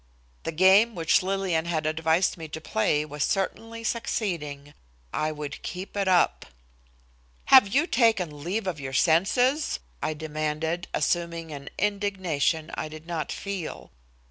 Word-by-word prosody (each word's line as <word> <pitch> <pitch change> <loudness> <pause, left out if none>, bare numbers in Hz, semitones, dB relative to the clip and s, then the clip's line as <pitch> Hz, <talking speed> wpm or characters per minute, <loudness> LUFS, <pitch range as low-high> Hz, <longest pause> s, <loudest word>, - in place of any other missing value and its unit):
The - - -1
game 190 +7 +5
which 165 -2 +3
Lillian 185 -3 0
had 160 -2 -1
advised 160 +3 +2
me 160 -2 -8
to 155 - -6
play 150 +3 0
was 150 0 -3
certainly 225 +4 -2
succeeding. 160 -11 -3 0.4
I 155 0 0
would 150 -1 -6
keep 185 +3 -6
it 200 -1 0
up. 180 -2 +3 1.1
"Have 260 -6 +10
you 280 +11 +2
taken 195 - +1
leave 195 +6 -2
of 180 -5 -3
your 135 -1 -6
senses?" 205 - +2 0.2
I 155 - -1
demanded, 155 +2 -3
assuming 170 -2 -1
an 140 -1 -7
indignation 190 -6 0
I - - -3
did 155 +1 -10
not 165 -4 -3
feel. 195 -5 -4
"Dr. - - -18
170 Hz, 145 wpm, -26 LUFS, 155-195 Hz, 1.1 s, Have